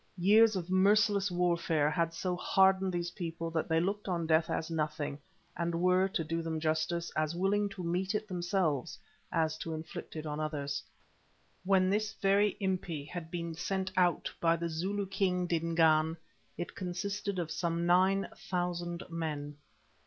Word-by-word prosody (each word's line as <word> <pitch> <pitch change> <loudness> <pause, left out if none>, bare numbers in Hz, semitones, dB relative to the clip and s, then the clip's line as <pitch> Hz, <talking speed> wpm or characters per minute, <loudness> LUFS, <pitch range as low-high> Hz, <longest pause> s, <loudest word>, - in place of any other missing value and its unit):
Years 210 +4 +5
of 180 -1 -3
merciless 200 +1 +4
warfare 170 -4 +1
had 165 -1 0
so 180 +2 -2
hardened 190 +1 +3
these 175 0 -2
people 165 -2 -5
that 165 0 -1
they 160 0 +3
looked 200 +5 -1
on 170 -3 -1
death 160 0 +3
as 165 +1 -2
nothing, 150 -2 -2 0.4
and 170 0 -1
were, 185 +1 +4
to 190 -4 -2
do 165 +2 -2
them 165 -1 -3
justice, 160 +2 -1
as 155 +1 0
willing 200 +3 +1
to 195 -2 -7
meet 180 +4 -1
it 215 0 -2
themselves 175 -6 -1 0.3
as 160 -1 0
to 165 -1 -4
inflict 160 +1 -8
it 155 0 -5
on 150 0 -3
others. 145 -2 -2 0.8
When 190 -1 +4
this 215 +1 0
very 200 0 +2
Impi 180 -6 -2
had 165 0 -7
been 170 -1 -4
sent 190 +3 -2
out 180 -2 +2
by 165 0 +4
the 170 0 -3
Zulu 190 +5 -2
King 185 -2 0
Dingaan, 165 -1 +2 0.4
it 175 - -5
consisted 195 +2 -3
of 170 -3 -2
some 170 -1 -1
nine 190 +3 +3 0.2
thousand 175 -1 -2
men. 150 -3 -4
175 Hz, 160 wpm, -32 LUFS, 160-190 Hz, 0.8 s, Years